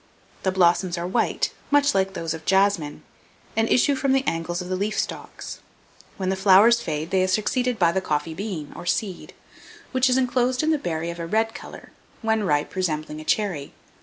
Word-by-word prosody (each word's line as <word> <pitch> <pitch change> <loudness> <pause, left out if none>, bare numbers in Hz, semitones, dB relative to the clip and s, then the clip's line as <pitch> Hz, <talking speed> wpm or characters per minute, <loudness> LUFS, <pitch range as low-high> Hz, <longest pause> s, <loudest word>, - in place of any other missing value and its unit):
The 190 - +1
blossoms 180 0 +2
are 170 - -3
white, 185 - 0 0.2
much 285 0 +4
like 195 0 0
those 165 -2 -2
of 160 -1 -8
jasmine, 190 -5 +1 0.5
and 225 0 +1
issue 280 +3 +4
from 270 0 +1
the 270 0 +2
angles 165 -1 -2
of 180 - -5
the 185 - -1
leaf 210 +3 -2
stalks. - - -5 0.6
When 190 -1 -2
the 190 - +1
flowers 200 +5 +6
fade, 155 -3 -4
they 190 - +3
are 185 - +2
succeeded 245 +5 0
by 170 -4 +4
the 190 +2 0
coffee 150 -1 -2
bean, 175 -5 -5
or 175 - -8
seed, 190 +1 -2 0.6
which 260 0 +3
is 250 - +3
inclosed 255 +1 +1
in 315 +1 +3
a 305 - 0
berry 170 -5 -3
of 170 - -9
a 165 - -4
red 225 +4 +1
colour, - - -11 0.3
when 220 -1 +1
ripe 145 -4 0
resembling 155 -4 -2
a - - -8
cherry. 175 -6 -1
190 Hz, 195 wpm, -24 LUFS, 170-225 Hz, 0.6 s, flowers